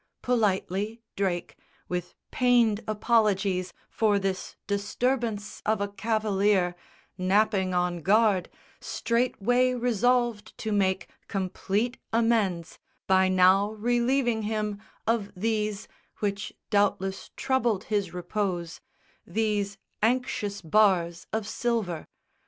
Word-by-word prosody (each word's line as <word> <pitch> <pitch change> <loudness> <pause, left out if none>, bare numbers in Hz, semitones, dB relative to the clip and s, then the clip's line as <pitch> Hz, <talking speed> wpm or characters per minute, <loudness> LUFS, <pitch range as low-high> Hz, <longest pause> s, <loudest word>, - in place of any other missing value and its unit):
Politely 210 -2 0 0.2
Drake, 185 -3 -2 0.3
with 180 -1 -4 0.2
pained 240 -4 +3
apologies 205 -4 +1 0.2
For 210 -2 +2
this 195 -1 -3
disturbance 210 +1 -1
of 215 -1 +1
a 200 - 0
cavalier 205 -3 +1 0.5
Napping 190 0 +2
on 180 -1 0
guard, 200 0 +3 0.3
straightway 245 +1 +1
resolved 240 -2 +1
to 220 - -3
make 190 -2 +1 0.2
Complete 200 +5 -1
amends, 220 -7 +1 0.3
by 190 0 +4
now 185 +3 +4
relieving 240 +1 +1
him 210 -1 -2 0.2
Of 220 -3 0
these 210 0 -1 0.3
which 205 -1 -2 0.2
doubtless 195 -2 +1
troubled 240 -7 +1
his 200 -5 -1
repose 180 -1 -3 0.5
These 205 -2 -1 0.2
anxious 215 -4 0
bars 175 -1 +2
of 220 -1 -1
silver. 220 -9 -2
210 Hz, 95 wpm, -27 LUFS, 190-225 Hz, 0.5 s, by